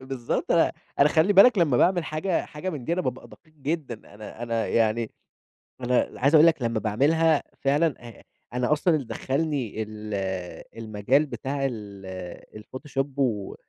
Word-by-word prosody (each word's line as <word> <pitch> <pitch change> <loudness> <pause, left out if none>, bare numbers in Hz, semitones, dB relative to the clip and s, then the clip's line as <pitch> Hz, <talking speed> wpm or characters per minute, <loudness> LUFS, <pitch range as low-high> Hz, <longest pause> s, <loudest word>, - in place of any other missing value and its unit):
بالضبط 130 -2 -2
أ - - +3 0.3
أنا 140 - +6
خلّي 160 +6 +3
بالك 200 +3 +7
لما 155 -8 +3
باعمل 175 +5 +3
حاجة 160 +4 -1
حاجة 180 +5 -5
من 140 -7 -6
دي، 165 - -1
أنا 185 - +1
بابقى 130 -6 -4
دقيق 155 -1 -19
جدًا، 140 -8 -5
أنا 110 +2 -10
أنا 115 -1 -1
يعني 115 0 +1 0.7
أنا 125 0 +1
عايز 140 +5 +4
أقول 155 +2 +8
لك 165 -4 +2
لمّا 115 -2 0
باعملها 145 +9 +2 0.2
فعلًا، 145 +2 +2
آآ 115 - -13 0.3
أنا 125 +1 0
أصلًا 160 +2 +2
اللي 140 -5 -3
دخلني 135 -5 -2
ال 105 0 -8 0.7
المجال 110 +7 +1
بتاع 140 -1 -5
ال 100 -3 -7
الPhotoshop 135 +2 -4
و 110 -7 -1
135 Hz, 160 wpm, -25 LUFS, 110-155 Hz, 0.7 s, أقول